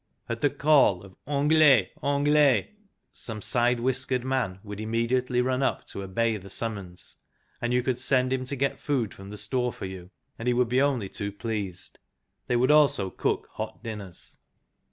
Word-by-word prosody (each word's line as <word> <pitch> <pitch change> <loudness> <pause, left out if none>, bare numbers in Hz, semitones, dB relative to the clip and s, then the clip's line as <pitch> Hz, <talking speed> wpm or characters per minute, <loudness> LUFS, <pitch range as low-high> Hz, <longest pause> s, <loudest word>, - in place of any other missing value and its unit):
At 115 -1 -4
the 145 - +4
call 140 -10 +4
of 95 -2 -14
" - - -36
Anglais, 150 -2 +5
Anglais! 145 -4 +3 0.2
" - - -51 0.2
some 110 -2 -4
side 120 +2 +1
whiskered 130 0 0
man 130 -8 -1
would 105 -1 -7
immediately 120 +3 0
run 130 +1 0
up 135 - 0
to 100 - -6
obey 110 +4 0
the 100 -1 -11
summons, 100 -5 -5 0.4
and 120 0 -1
you 125 0 +2
could 125 -1 -1
send 130 0 +2
him 130 -1 -1
to 140 - -3
get 140 +1 -1
food 130 -8 -1
from 95 0 -11
the 105 - -7
Store 125 +4 -1
for - - -7
you, 95 -1 -8 0.3
and 115 - -4
he 125 - +3
would 125 -1 +2
be 125 +2 +3
only 135 -8 +1
too 100 +1 -3
pleased. 100 -4 -5 0.5
They 125 - +1
would 125 +3 +4
also 140 -11 +4
cook - - -1
hot - - -6
dinners. 105 -6 -8
120 Hz, 185 wpm, -27 LUFS, 105-130 Hz, 0.5 s, Anglais